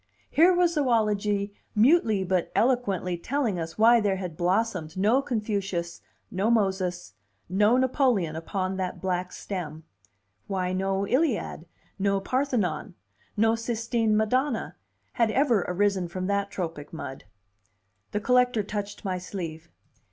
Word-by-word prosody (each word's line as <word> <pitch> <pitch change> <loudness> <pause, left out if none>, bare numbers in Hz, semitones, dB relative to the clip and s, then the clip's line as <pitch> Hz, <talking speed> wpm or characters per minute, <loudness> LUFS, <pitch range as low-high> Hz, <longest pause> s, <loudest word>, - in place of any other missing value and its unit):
Here 340 +4 +6
was 350 -1 +3
zoology 210 -7 +1 0.2
mutely 220 - +4
but 185 -1 0
eloquently 200 -8 +1
telling 235 -4 -1
us 165 0 -5
why 230 +2 +6
there 200 -2 +1
had 180 -4 -5
blossomed 180 -2 -1
no 215 +8 +3
Confucius, 200 -9 -3 0.3
no 195 +4 0
Moses, 190 - 0 0.3
no 210 +6 +3
Napoleon, 250 - +2
upon 185 +3 -3
that 185 -1 -3
black 180 -1 -2
stem; 160 -5 -6 0.6
why 185 -1 -1
no 195 +1 0
Iliad, 245 - 0 0.3
no 195 0 +2
Parthenon, 205 - -1 0.4
no 225 +1 +4
Sistine 230 -1 0
Madonna, 250 +4 0 0.4
had 230 -2 +2
ever 235 -7 +2
risen 190 -1 +1
from 185 +2 -4
that 200 +1 0
tropic 165 -6 -5
mud. 135 -5 -7 0.9
The 205 - -1
collector 250 -2 +3
touched 205 0 -5
my 185 -1 -1
sleeve. 170 -3 -6
200 Hz, 125 wpm, -26 LUFS, 180-230 Hz, 0.9 s, Here